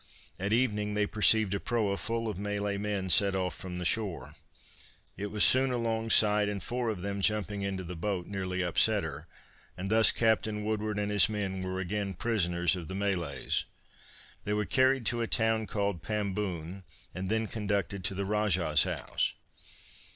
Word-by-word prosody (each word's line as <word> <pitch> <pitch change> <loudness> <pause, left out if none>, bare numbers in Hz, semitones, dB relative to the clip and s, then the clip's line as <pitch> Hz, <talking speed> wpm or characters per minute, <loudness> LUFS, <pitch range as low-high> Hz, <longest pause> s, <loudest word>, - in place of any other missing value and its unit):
At 100 +2 -2
evening 105 -3 +1
they 105 0 +2
perceived 110 -1 +3
a 100 - -1
proa 110 -4 0
full 115 +2 -3
of 105 -4 -4
Malay 105 0 -2
men 100 -2 -2
set 100 +3 +4
off 90 -1 -1
from 90 -1 -7
the 90 - -4
shore. 100 -1 -2 0.8
It 100 +2 -4
was 105 0 +1
soon 130 +1 +6
along 115 -2 -1
side, 105 -1 +5
and 100 -1 -4
four 120 +1 -2
of 95 -5 -4
them 100 0 -3
jumping 105 0 0
into 95 -1 -3
the 90 +1 -7
boat 90 +1 -3
nearly 95 -2 -3
upset 100 +4 +3
her, 75 0 -6 0.5
and 95 +2 -4
thus 110 0 +6
Captain 110 -2 0
Woodward 105 -1 -2
and 105 0 -1
his 105 +1 +5
men 100 -3 -3
were 95 0 -3
again 100 +1 -3
prisoners 90 -5 +1
of 85 -3 -7
the 95 - -6
Malays. 90 -9 -1 0.8
They 105 - -2
were 105 0 0
carried 130 0 +2
to 120 +2 0
a 115 - -1
town 110 -1 +2
called 100 -4 -2
Pamboon 95 -4 -3 0.3
and 95 +1 -4
then 110 +1 0
conducted 100 -4 -2
to 100 - +2
the 100 +1 -2
Rajah's 95 -7 +2
house. - - -1
100 Hz, 175 wpm, -30 LUFS, 95-110 Hz, 0.8 s, soon